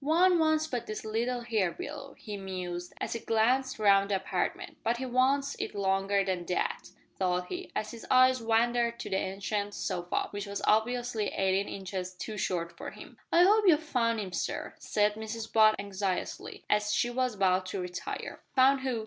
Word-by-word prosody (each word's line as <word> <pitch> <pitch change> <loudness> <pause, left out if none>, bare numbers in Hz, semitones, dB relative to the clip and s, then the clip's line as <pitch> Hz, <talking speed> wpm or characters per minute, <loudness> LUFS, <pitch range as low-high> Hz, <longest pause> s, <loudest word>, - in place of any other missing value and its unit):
"`One 345 +4 +4
wants 315 -1 +3
but 250 -7 -4 0.2
little 235 +3 -1
here 220 -7 0
below,'" 285 -2 -7
he 210 -2 -7
mused, 180 -2 -5
as - - -2
he 230 - -3
glanced 250 +5 +1
round 200 -2 +4
the 200 - +2
apartment; 190 - -2
"but 235 +1 +1
he 260 - -3
wants 270 +3 +2
it - - -4
longer 195 0 +1
than 185 -2 -1
that," 180 - -2 0.3
thought 180 -1 0
he, 370 +1 -6
as 215 - -2
his 230 - -9
eyes 255 0 +5
wandered 235 +1 +2
to - - -6
the - - +1
ancient 200 +2 -2
sofa, 175 0 -2
which 205 0 -5
was 200 0 -4
obviously 230 0 +1
eighteen 195 +1 +1
inches 185 -1 -5
too 215 +4 -6
short 170 -4 -2
for - - -6
him. - - -12 0.2
"I 345 - +6
'ope 420 +2 +5
you've 320 -3 +5
found 230 -6 +1
'im, 195 -3 -4
sir," - - -3
said 210 0 +1
Mrs 220 +1 -6
Butt 215 -1 +6
anxiously, 195 -2 -3
as 210 0 +2
she 240 +3 +1
was 255 -2 0
about 185 -1 +2
to 190 - -4
retire. 180 0 -5
"Found 265 +1 +5
who?" 260 -3 -2
220 Hz, 185 wpm, -30 LUFS, 195-250 Hz, 0.3 s, I